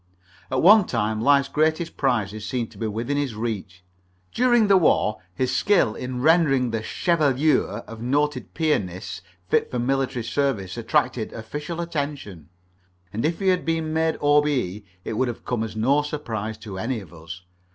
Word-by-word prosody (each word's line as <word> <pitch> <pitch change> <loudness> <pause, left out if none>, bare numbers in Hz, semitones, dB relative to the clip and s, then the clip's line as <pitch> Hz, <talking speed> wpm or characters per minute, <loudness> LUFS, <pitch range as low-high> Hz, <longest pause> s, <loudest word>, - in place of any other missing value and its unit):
At 130 - 0
one 205 +2 +8
time 110 -2 -1
life's 140 +2 +4
greatest 155 +3 0
prizes 110 -6 0
seemed 115 +1 -3
to - - -15
be 115 - -1
within 115 +7 -2
his 140 -6 -2
reach. 100 -5 -5 0.5
During 240 -2 +4
the 200 -1 +5
war 110 - +2
his 130 +5 0
skill 195 - +3
in 125 +1 -5
rendering 145 -6 +4
the 115 -1 -2
chevelure 145 - +1
of 115 -1 -10
noted 140 +2 -1
pianists 95 - -1 0.3
fit - - +1
for 125 - -3
military 130 -1 0
service 110 -9 -1
attracted 115 0 0
official 150 +9 -6
attention, 140 - -4 0.6
and 110 - -2
if 165 +2 0
he 195 -1 +2
had 180 -1 +2
been 165 -1 -1
made 160 0 +1
O.B.E. 145 -9 +2 0.2
it - - -3
would 130 +4 +1
have 120 - -6
come 120 -3 -1
as 110 -1 -6
no 135 +7 +3
surprise 115 -8 -4
to 105 -4 -8
any 115 +3 -2
of 95 -5 -13
us. 85 +2 -10
125 Hz, 165 wpm, -24 LUFS, 110-150 Hz, 0.6 s, one